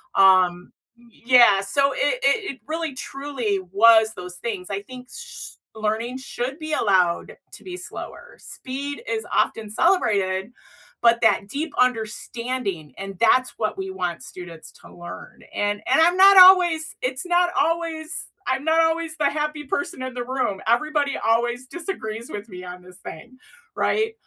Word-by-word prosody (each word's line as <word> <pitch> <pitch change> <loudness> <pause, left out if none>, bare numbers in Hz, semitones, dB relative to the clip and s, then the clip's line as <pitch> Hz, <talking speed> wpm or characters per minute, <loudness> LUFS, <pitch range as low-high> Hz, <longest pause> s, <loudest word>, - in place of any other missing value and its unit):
Um, 185 -2 +4 0.3
y 240 0 -22 0.2
yeah, 240 -5 +6
so 280 +8 +1
i - - -8 0.3
i - - +6 0.2
it 265 - -20
really 320 -2 -3
truly 260 -7 -3
was 220 +1 +6
those 180 -1 -8
things. 195 -4 -5
I 200 0 -3
think 255 +2 -11
s 480 0 -9 0.2
learning 220 +3 -2
should 265 +2 -5
be 310 -1 -5
allowed 185 -8 +1 0.2
to - - -13
be 365 -1 -7
slower, 485 +6 -9
speed 280 +4 -6
is 440 +1 -2
often 220 -2 0
celebrated, 210 - +1 0.5
but 235 0 +4
that 220 -3 +3
deep 290 +8 -4
understanding, 230 - -2
and 195 -1 -7
that's 255 +2 +3
what 215 -1 -2
we 190 0 -4
want 180 -2 -4
students 170 -3 -10
to - - -17
learn. 175 0 -10
And 205 0 -1
and 270 - +3
I'm 345 +2 +4
not 390 +1 +8
always 360 -4 +7
it's 260 +5 -2
not 355 0 +2
always 325 0 -2 0.2
I'm 265 +1 -1
not 320 +1 +4
always 325 -1 -1
the 290 -2 +2
happy 300 0 -3
person 350 +2 -3
in 260 0 -5
the 245 0 -4
room, 245 -6 -2
everybody 285 +4 +1
always 240 +2 0
disagrees 245 - -6
with 205 +1 -7
me 180 -2 -9
on 180 0 -9
this 180 0 -15
thing, 250 +4 -11 0.4
right? 440 +1 0
250 Hz, 160 wpm, -23 LUFS, 205-310 Hz, 0.5 s, not